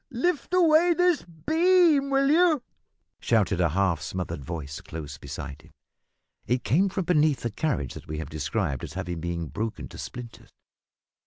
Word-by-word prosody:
lift 300 +7 -1
away 340 -1 +5
this 355 -2 +3
beam, 315 - +3
will 275 0 +3
you?" 320 -5 +4 0.6
shouted 105 -6 +2
a 85 - +3
half 90 -2 +1
smothered 85 -1 -4
voice 75 0 -6
close 75 -3 -8
beside 70 +2 -7
him. 80 - -19 0.8
It 125 +1 0
came 180 - +3
from 190 -1 -3
beneath 155 -4 +3
the 120 - -2
carriage 110 - -2
that - - -11
we 75 - -4
have 80 -1 -6
described 70 -3 -2
as - - -6
having 85 -1 -4
been 85 -2 -3
broken 110 +1 -4
to - - -11
splinters. 120 -2 -9
120 Hz, 160 wpm, -26 LUFS, -, 0.8 s, away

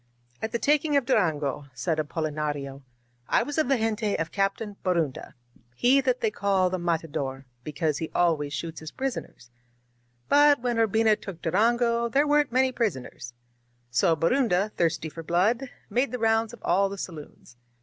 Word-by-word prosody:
^^At 220 - -2
the 235 - -1
taking 295 +3 +2
of 275 - +1
Durango," 150 - 0
said 155 +6 -1
Apolinario, 150 -3 -3 0.5
^^I - - +3
was 290 +2 -2
of 310 - +2
the 270 - +3
gente 220 -2 -1
of 165 0 -3
Captain 200 +1 -1
Borunda; 170 -7 -1 0.4
he 260 - +4
that - - 0
they 445 -2 +1
call 195 - +1
the 185 - -2
Matador, 150 -6 -2 0.2
because 150 0 -2
he 160 - -4
always 160 -5 +1
shoots 165 +2 -5
his. 155 - -8
prison 265 +7 -3
ers. 120 - -21 0.8
But 290 0 +5
when 240 -1 -1
Urbina 220 -1 +3
took 190 -4 -8
Durango 235 +3 +2
ther^ 285 +4 +2
weren't 295 -2 +3
many 260 +1 +3
prisoners. 130 - -4 0.6
So 165 +7 +3
Borunda^ 205 - +1
thirsty 165 -3 0
for 165 +1 -8
blood, 210 - +1 0.2
made 255 +3 0
the 250 - -2
rounds 225 -1 +1
of 240 - -14
all 195 +3 +2
the 200 - -7
saloons. 155 -8 -9
195 Hz, 165 wpm, -26 LUFS, 160-240 Hz, 0.8 s, But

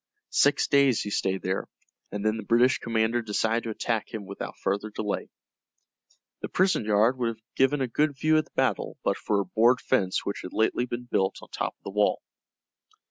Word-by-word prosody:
Six 140 0 +3
days 140 -4 +4
he 105 - -5
stayed 95 -1 -1
there, 95 +1 -2 0.4
and 105 +1 -4
then 110 +1 +2
the - - -4
British 120 +4 +3
commander 115 +1 0
decided 110 +1 0
to - - -3
attack 110 0 -2
him 110 -3 -6
without 100 +1 -7
further 100 +2 -2
delay. 105 -1 -3 1.1
The - - -4
prison 185 - +2
yard 110 +5 +3
would 120 - +1
have 110 -1 -5
given 135 +2 +2
a 130 - +1
good 145 +3 0
view 155 +2 +3
of 155 - -2
the - - -26
battle - - 0
but - - +1
for 105 -2 0
a 100 - -1
board 115 +7 +3
fence 95 -10 0
which 100 - -3
had 90 - -8
lately 110 +3 +1
been 120 0 -4
built 95 -6 0
on - - -13
top - - -3
of - - -50
the - - -6
wall. 105 0 +2
110 Hz, 200 wpm, -27 LUFS, 105-125 Hz, 1.1 s, days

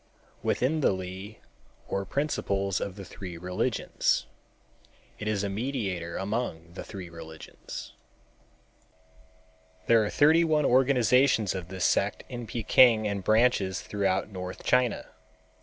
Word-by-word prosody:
within 145 +6 +1
the - - +4
Li 95 +3 -6 0.5
or 100 0 -2
principles 100 -9 -1
of 95 - -4
the 100 -2 -9
three 90 -3 -8
religions. 90 +2 0 0.9
It 105 - -5
is 105 -2 0
a - - 0
mediator 100 -6 -3
among 95 -5 -3
the - - -7
three 95 -3 -8
religions. 80 -1 -10 1.9
There 115 -1 +5
are 105 - -1
thirty 160 +3 +5
one 155 -3 +2
organizations 125 -3 +3
of 90 -3 -5
this 95 -1 -2
sect - - +1
in 120 -2 -6
Peking 115 0 +4
and 100 -2 -3
branches 110 -3 +2
throughout 100 -1 -1
North 90 -2 -7
China. 125 -3 +2
100 Hz, 125 wpm, -28 LUFS, 95-125 Hz, 1.9 s, There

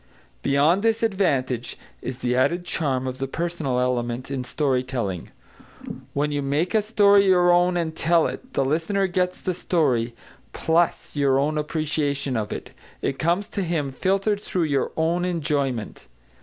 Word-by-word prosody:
Beyond 145 +7 +3
this 225 +1 +1
advantage, 135 - 0 0.2
is 130 -1 -5
the 125 -1 -1
added 170 +8 +1
charm 135 -7 -1
of 130 0 -4
the 135 - -2
personal 155 -4 -2
element 125 0 -1
in 135 -2 -2
story 130 0 0
telling. 115 -9 -4 0.9
When 145 +1 0
you 145 -1 -1
make 145 +7 0
a 220 - +4
story 205 -2 +4
your 180 -1 +5
own 175 0 +3
and 160 -2 -2
tell 165 0 +3
it, 255 0 -6
the 135 - +1
listener 165 +8 +1
gets 180 0 -1
the 185 - -2
story, 130 -10 0 0.4
plus 165 0 0
your 140 -2 +3 0.2
appreciation 150 -3 -1
of 110 -2 -2
it. - - -6 0.3
It 135 - -1
comes 175 +5 +1
to 200 - -3
him 160 -6 -1
filtered 195 +8 0
through 185 -4 -1
your 140 -4 0
own 165 +2 +1
enjoyment. 145 -9 -2
155 Hz, 155 wpm, -24 LUFS, 130-180 Hz, 0.9 s, your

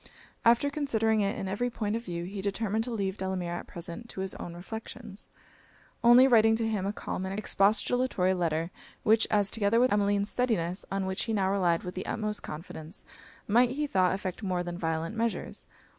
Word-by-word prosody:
After 240 +5 +4
considering 225 -7 +1
it 200 +4 0
in 195 - -3
every 205 +6 -1
point 215 -2 -2
of 230 - -3
view, 170 -4 -4
he 195 +2 -5
determined 210 +2 -1
to 250 - -5
leave 200 -3 -2
Delamere 185 -2 -2
at - - -10
present 175 +7 -8
to 190 - -6
his 190 0 -3
own 170 - -7
reflections; 220 +3 -8 0.7
only 240 +2 +8
writing 225 -3 +5
to 225 0 0
him 205 -3 -1
a - - 0
calm 190 - -4
and 190 +1 -3
expostulatory 210 -1 +2
letter; 165 -1 -1 0.4
such 220 +1 +5
as, 205 -2 +2
together 225 +1 +2
with 255 -1 +4
Emmeline's 205 0 +1
steadiness, 195 -8 0
on 195 -1 -1
which 190 0 -2
he 225 - -2
now 195 -2 +1
relied 175 -4 +2
with 180 - -5
the 185 - -5
utmost 215 -1 -2
confidence, 155 0 -8 0.4
might, 240 +4 +5
he 290 +4 -1
thought, 190 -8 +2
effect 190 -1 -5
more 185 -3 -1
than 175 0 -5
violent 165 +3 -2
measures. 230 0 -3
200 Hz, 190 wpm, -29 LUFS, 185-225 Hz, 0.7 s, only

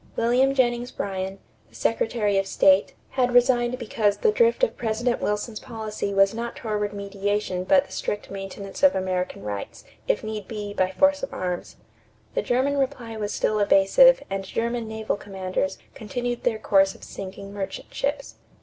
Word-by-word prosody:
William 255 +4 +3
Jennings 240 -2 +1
Bryan, 190 -2 -4 0.3
the - - -21
Secretary 210 - +1
of 195 - -2
State, 190 0 +4 0.2
had 250 -2 +1
resigned 245 0 +4
because 215 -4 0
the 445 - +3
drift 470 +2 +3
of - - +3
President 235 +1 -1
Wilson's 210 +1 -2
policy 220 -4 -4
was 195 0 +4
not 235 +1 -4
toward 210 -2 -2
mediation 200 -2 -2
but 280 +6 +4
the - - -18
strict 205 - -4
maintenance 195 0 -7
of 285 -1 +6
American 185 - -2
rights, 100 -1 -6 0.2
if - - +1
need 215 -2 -5
be, 210 -2 -5
by 185 -2 +1
force 285 +9 +3
of - - -4
arms. 180 -1 -4 0.6
The - - +1
German 270 +3 +1
reply 255 -4 -2
was 210 -1 -3
still 215 - 0
evasive 210 - +6
and 195 0 -3
German 230 +3 -2
naval 220 -1 -2
commanders 190 -2 -3 0.2
continued 240 +2 -4
their 230 -3 +2
course 195 -2 +3
of - - -16
sinking 195 +1 -8
merchant 195 -2 -6
ships. 280 +1 -3
215 Hz, 165 wpm, -25 LUFS, 195-245 Hz, 0.6 s, of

